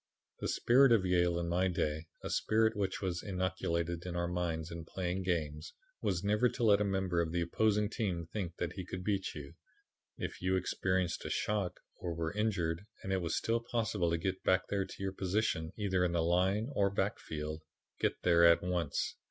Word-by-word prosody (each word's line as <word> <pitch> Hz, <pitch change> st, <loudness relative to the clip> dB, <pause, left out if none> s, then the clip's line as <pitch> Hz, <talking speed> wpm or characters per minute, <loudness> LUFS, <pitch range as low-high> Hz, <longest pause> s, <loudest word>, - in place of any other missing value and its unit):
"The -, -, -2 dB
spirit 130 Hz, +2 st, +5 dB
of 110 Hz, -5 st, +4 dB
Yale 90 Hz, -1 st, +3 dB
in 85 Hz, 0 st, -1 dB
my 90 Hz, +2 st, +2 dB
day, 80 Hz, -2 st, -1 dB, 0.2 s
a -, -, -4 dB
spirit 110 Hz, 0 st, +2 dB
which 100 Hz, 0 st, -2 dB
was 90 Hz, -2 st, -1 dB
inculcated 85 Hz, -3 st, -1 dB
in 90 Hz, -1 st, -5 dB
our 85 Hz, 0 st, 0 dB
minds 85 Hz, -2 st, -2 dB
in 85 Hz, 0 st, -6 dB
playing 90 Hz, +2 st, -3 dB
games, 80 Hz, -4 st, -2 dB, 0.3 s
was 90 Hz, 0 st, 0 dB
never 105 Hz, +4 st, +3 dB
to 120 Hz, -, -4 dB
let 105 Hz, -2 st, +5 dB
a -, -, +4 dB
member 95 Hz, -3 st, +1 dB
of 80 Hz, -1 st, -2 dB
the 85 Hz, 0 st, 0 dB
opposing 105 Hz, +4 st, +2 dB
team 95 Hz, -6 st, -2 dB
think 95 Hz, -6 st, -3 dB, 0.2 s
he 95 Hz, -, -5 dB
could 90 Hz, +1 st, -6 dB
beat 100 Hz, 0 st, -1 dB
you. 70 Hz, -2 st, -8 dB, 0.6 s
If -, -, -5 dB
you 95 Hz, +1 st, +2 dB
experienced 95 Hz, -1 st, 0 dB
a -, -, -4 dB
shock 105 Hz, -4 st, -1 dB, 0.2 s
or 85 Hz, -2 st, -3 dB
were 80 Hz, 0 st, -2 dB
injured 100 Hz, -4 st, -1 dB, 0.2 s
and 95 Hz, -, -2 dB
it 95 Hz, -, +1 dB
was 85 Hz, -1 st, -1 dB
still 115 Hz, +1 st, +1 dB
possible 110 Hz, -6 st, 0 dB
to 85 Hz, -, +1 dB
get 95 Hz, +2 st, -2 dB
back 95 Hz, 0 st, +2 dB
to 100 Hz, -1 st, 0 dB
your 95 Hz, -1 st, -3 dB
position 95 Hz, -4 st, 0 dB
either 95 Hz, -4 st, +1 dB
in 90 Hz, -1 st, +1 dB
the 85 Hz, -1 st, +2 dB
line 95 Hz, +8 st, +2 dB
or 100 Hz, -5 st, +3 dB
backfield 80 Hz, -6 st, -3 dB, 0.4 s
get -, -, 0 dB
there 85 Hz, -1 st, +5 dB
at 85 Hz, 0 st, +6 dB
once. 90 Hz, -5 st, -1 dB
90 Hz, 195 wpm, -33 LUFS, 85-100 Hz, 0.6 s, at